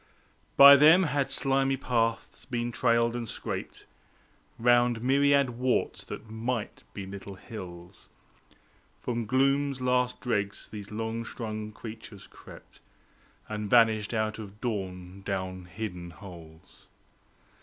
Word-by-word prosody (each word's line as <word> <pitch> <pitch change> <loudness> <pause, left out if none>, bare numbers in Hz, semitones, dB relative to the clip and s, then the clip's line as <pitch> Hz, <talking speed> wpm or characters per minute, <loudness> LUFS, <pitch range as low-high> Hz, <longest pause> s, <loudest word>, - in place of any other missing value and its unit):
By 140 0 +11
them 160 +6 +7
had 145 -4 0
slimy 135 0 +1
paths 115 -3 -1
been 120 -1 -3
trailed 115 0 +2
and 120 -3 -4
scraped - - -6 0.7
Round 120 0 +3
myriad 140 0 +3
warts 125 +1 -1
that - - -8
might 110 0 -4
be 100 - -5
little 100 0 -8
hills. 90 -4 -10 0.9
From 120 -2 -3
gloom's 135 +2 +2
last 125 0 +1
dregs 105 -5 -2
these 105 -1 -9
long 110 +1 -3
strung 110 -2 -6
creatures 110 -3 -10
crept, - - -15 0.7
And 105 -1 -4
vanished 110 -3 +4
out 110 -1 -1
of 105 -1 -10
dawn 95 -5 -5
down 95 -2 -4
hidden 90 -3 -6
holes. 85 -3 -14
115 Hz, 115 wpm, -28 LUFS, 100-125 Hz, 0.9 s, By